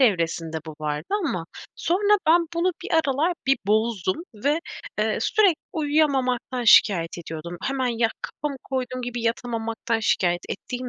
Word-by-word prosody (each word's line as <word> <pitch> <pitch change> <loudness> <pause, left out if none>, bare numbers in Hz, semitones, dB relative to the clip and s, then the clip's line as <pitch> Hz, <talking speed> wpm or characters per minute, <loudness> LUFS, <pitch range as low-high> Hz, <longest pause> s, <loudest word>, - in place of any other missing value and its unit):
evresinde 165 -8 +1
bu 155 - -7
vardı 150 +1 -3 0.2
ama 175 - -2 0.3
sonra 410 +4 +2
ben 335 +1 +5
bunu 355 +2 +1
bir 385 - -7
aralar 315 +2 +2
bir 270 0 +4
bozdum 215 -3 +1 0.2
ve, 285 +9 +1 0.4
eee, - - +1
sürekli 395 -7 +3 0.2
uyuyamamaktan 270 -5 +1
şikâyet 175 -6 +5
ediyordum. 170 +1 -7
Hemen, 270 -1 -1
ya, 230 -1 +1
kafamı 290 -2 -4
koyduğum 255 -1 -3
gibi 245 -1 -4
yatamamaktan 230 0 -1
şikâyet 175 -5 +1
ettiğim 250 +5 -5
245 Hz, 140 wpm, -24 LUFS, 190-290 Hz, 0.4 s, ben